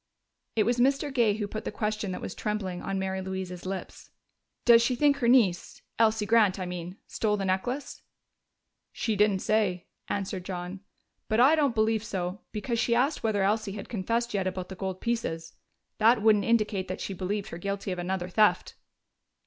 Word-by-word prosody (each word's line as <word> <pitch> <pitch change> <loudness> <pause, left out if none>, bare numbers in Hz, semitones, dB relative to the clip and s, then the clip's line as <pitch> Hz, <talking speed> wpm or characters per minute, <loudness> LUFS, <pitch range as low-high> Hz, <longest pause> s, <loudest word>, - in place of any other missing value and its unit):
It 220 - +4
was 240 +3 +1
Mr. 275 +3 +2
Gay 230 -5 +3
who 210 -1 -3
put 215 +2 -6
the - - -4
question 210 -2 -2
that 180 - -5
was - - -5
trembling 200 -4 -3
on 195 0 -3
Mary 190 0 -2
Louise's 185 -1 -5
lips: 190 0 -6 0.6
"Does 235 -1 +8
she 245 +2 +1
think 285 +2 +3
her 245 -4 0
niece 220 -9 +2 0.2
Elsie 220 -1 +3
Grant, 215 -3 +4
I 185 - -3
mean 180 +1 -6
stole 210 -2 -1
the 195 - -2
necklace?" 245 +9 -2 0.9
"She 220 - -1
didn't 205 -2 +2
say," 200 -5 +1 0.2
answered 190 -2 -3
John. 180 0 -5 0.5
"But 220 - +2
I 265 +5 +7
don't 285 -6 +2
believe 220 0 +2
so, 185 -2 -4
because 230 +2 -2
she 235 0 +2
asked 265 +6 +1
whether 210 -3 +1
Elsie 210 0 0
had 205 - -8
confessed 230 +3 -1
yet 195 -2 0
about 185 -1 -4
the 190 - -7
gold 190 0 -4
pieces. 165 -9 -2 0.5
That 220 0 +4
wouldn't 210 -2 +4
indicate 215 -4 +1
that 185 - -5
she 195 - -4
believed 200 +2 -3
her 170 - -7
guilty 200 +1 -3
of 180 - -3
another 180 0 -2
theft." 210 +3 +2
205 Hz, 185 wpm, -28 LUFS, 190-230 Hz, 0.9 s, Does